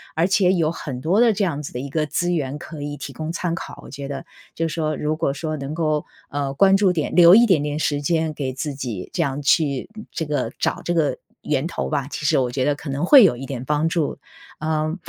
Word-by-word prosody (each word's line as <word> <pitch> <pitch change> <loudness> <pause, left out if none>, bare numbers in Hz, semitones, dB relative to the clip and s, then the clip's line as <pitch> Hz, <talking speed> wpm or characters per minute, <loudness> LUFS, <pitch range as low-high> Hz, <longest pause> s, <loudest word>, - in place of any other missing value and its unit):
而 165 - +3
且 190 -1 +3
有 165 -4 +1
很 135 -6 -6
多 175 +9 +2
的 235 -2 +5
这 200 0 -1
样 155 -5 -1
子 140 - -8
的 125 - -4
一 140 - -6
个 155 +2 0
资 175 +4 -1
源 145 -4 -2
可 155 -1 -9
以 145 0 -4
提 140 0 -7
供 155 +3 -5
参 170 0 -2
考， 170 - -7
我 - - -11
觉 140 0 -7
得。 135 -1 -5 0.3
就 165 - -1
是 150 - -5
说 155 -2 -1
如 155 +1 -2
果 140 - 0
说 155 +2 -4
能 140 +1 -5
够， 155 -2 0 0.2
呃， 140 -1 -2
关 195 +7 +5
注 195 -3 +3
点 155 -3 -2
留 175 +1 +8
一 235 +2 +7
点 185 -10 +3
点 150 0 -2
时 145 -2 0
间 160 +1 0
给 135 -3 -3
自 140 +2 -4
己 120 -9 -5
这 175 - -1
样 140 0 -2
去 140 -1 +1 0.2
这 160 - -2
个 145 -6 -1
找 - - -1
这 175 - 0
个 160 -4 +1 0.2
源 145 -1 -1
头 170 - -3
吧， 140 -3 -1
其 150 - -5
实 - - +3
我 125 -2 +1
觉 130 +1 -1
得 145 - +2
可 145 +1 -8
能 140 +5 -1
会 265 +2 +9
有 170 - +4
一 135 - -6
点 130 -2 -5
帮 150 +3 +1
助。 165 -3 -1 0.4
呃， 155 0 -1
150 Hz, 275 characters per minute, -22 LUFS, 140-165 Hz, 0.4 s, 会